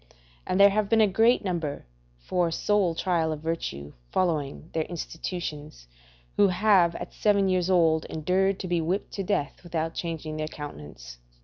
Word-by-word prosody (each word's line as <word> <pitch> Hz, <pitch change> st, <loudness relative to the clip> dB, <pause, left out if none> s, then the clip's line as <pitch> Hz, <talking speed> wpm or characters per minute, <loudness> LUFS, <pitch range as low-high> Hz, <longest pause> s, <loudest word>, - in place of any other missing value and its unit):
And 185 Hz, -, 0 dB
there 200 Hz, 0 st, +8 dB
have 210 Hz, 0 st, 0 dB
been 225 Hz, -, +4 dB
a 215 Hz, -, +7 dB
great 225 Hz, +5 st, +3 dB
number, 165 Hz, -6 st, -3 dB, 0.3 s
for 175 Hz, -, 0 dB
a -, -, -3 dB
sole 190 Hz, -1 st, +1 dB
trial 165 Hz, -3 st, 0 dB
of 155 Hz, -1 st, -5 dB
virtue, 75 Hz, -, -4 dB, 0.2 s
following 155 Hz, -3 st, -1 dB
their 160 Hz, -1 st, 0 dB
institutions, 160 Hz, -, -6 dB, 0.5 s
who 205 Hz, -, +6 dB
have 185 Hz, -2 st, +3 dB
at -, -, -7 dB
seven 200 Hz, -2 st, +2 dB
years 185 Hz, -1 st, +1 dB
old 165 Hz, -3 st, +3 dB
endured 185 Hz, +5 st, 0 dB
to 185 Hz, -, -4 dB
be 175 Hz, -1 st, +1 dB
whipped 180 Hz, +5 st, -2 dB
to 195 Hz, -, -3 dB
death 175 Hz, -7 st, -2 dB
without 165 Hz, -1 st, -3 dB
changing 160 Hz, -2 st, -4 dB
their 155 Hz, 0 st, -2 dB
countenance. 75 Hz, -, -9 dB
170 Hz, 170 wpm, -26 LUFS, 155-190 Hz, 0.5 s, there